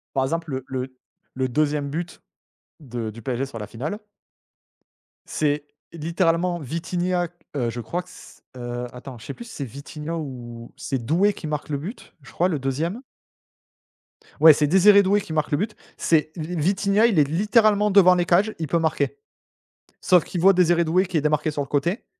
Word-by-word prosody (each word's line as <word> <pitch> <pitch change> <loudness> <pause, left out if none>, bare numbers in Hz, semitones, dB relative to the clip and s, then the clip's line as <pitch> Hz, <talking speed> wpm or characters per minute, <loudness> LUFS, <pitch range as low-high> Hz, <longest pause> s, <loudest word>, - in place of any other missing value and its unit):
Par 135 - +2
exemple 165 +3 -2
le 130 -1 -3
le 130 0 -5 0.4
le 130 0 -1
2e 145 +1 0
but 165 +3 -5 0.6
de 120 -6 -5
du 115 +2 -11
PSG 130 +3 -2
sur 135 -4 -8
la 105 - -6
finale 150 - -5 1.3
c'est 145 -1 -1 0.3
littéralement 170 +2 0
Vitinha, 175 +4 -2 0.3
heu, 120 -4 0
je 120 +1 -5
crois 170 +10 -3
que - - -20
s - - -15
heu, 120 0 -4
attends 125 0 -9
je 110 - -13
sais 140 - -5
plus 235 - -10
c'est 225 -11 -6
Vitinha 150 +5 -6
ou 120 -6 -8
c'est 130 -4 -4
Doué 180 - +2
qui 160 - -7
marque 150 0 -4
le 145 - -1
but, 185 - -8
je 135 - -15
crois, 180 +2 +1
le 155 -5 -1
2e. 160 - -2 1.4
Ouais 160 0 +9
c'est 150 +1 +1
Désiré 200 +5 +6
Doué 200 +2 +2
qui 160 - -7
marque 155 -1 -1
le 145 - +2
but. 210 +5 -2 0.2
C'est 155 -1 +2
li 165 +2 -5
Vitinha, 200 +6 +2
il 205 -9 +2
est 145 - +4
littéralement 210 - +3
devant 185 -2 +7
les 175 -1 +1
cages. 195 +6 +3
Il 160 - -2
peut 170 +4 +1
marquer 160 - 0 0.9
sauf 180 -2 +5
qu'il 175 - -4
voit 195 +3 +7
Désiré 175 -2 +3
Doué 180 +4 +2
qui 180 -1 -4
est - - +3
démarqué 150 +1 +1
sur 145 -1 -2
le - - -7
côté 160 - -1
160 Hz, 190 wpm, -23 LUFS, 140-180 Hz, 1.4 s, Ouais